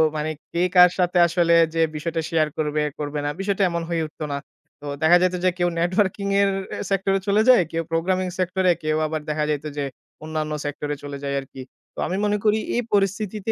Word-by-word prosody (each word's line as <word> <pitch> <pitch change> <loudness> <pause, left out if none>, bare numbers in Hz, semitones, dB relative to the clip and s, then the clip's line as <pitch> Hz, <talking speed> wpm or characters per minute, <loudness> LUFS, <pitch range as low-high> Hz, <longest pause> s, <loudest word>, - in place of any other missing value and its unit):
মানে 150 +1 -2 0.2
কে 170 - -1
কার 180 0 +9
সাথে 180 0 +2
আসলে 170 0 +2 0.2
যে 165 - +1
বিষয়টা 165 +2 -2
শেয়ার 155 -2 +2
করবে, 150 -1 0 0.2
করবে 150 0 -3
না। - - 0
বিষয়টা 195 0 0
এমন 170 -1 -2
হয়ে 165 -1 0
উঠত 155 - -21
না। 140 - -1 0.4
তো - - -10 0.2
দেখা 165 +3 +6
যাইত 185 0 +2
যে - - +6
কেউ 175 -1 +2
নেটওয়ার্কিং 190 +3 0
এর 200 - +3 0.4
সেক্টরে 195 0 +1
চলে 205 +2 +4
যায়, 250 -6 +8
কেউ 165 0 -1
প্রোগ্রামিং 185 +3 0
সেক্টর 185 +1 0
এ - - +4
কেউ 155 0 0
আবার 155 0 -3
দেখা 150 0 0
যাইত 150 0 -2
যে 145 - -1 0.4
অন্যান্য 155 -1 -3
সেক্টর 145 0 -4
এ - - -4
চলে 145 0 -6
যাই 140 0 -2
আরকি। 135 -1 -10 0.3
তো - - -8
আমি 185 - -2
মনে 210 0 +1
করি 215 0 +3 0.2
এই 240 - +2
পরিস্থিতিতে 205 +1 0
170 Hz, 210 wpm, -23 LUFS, 155-190 Hz, 0.4 s, কার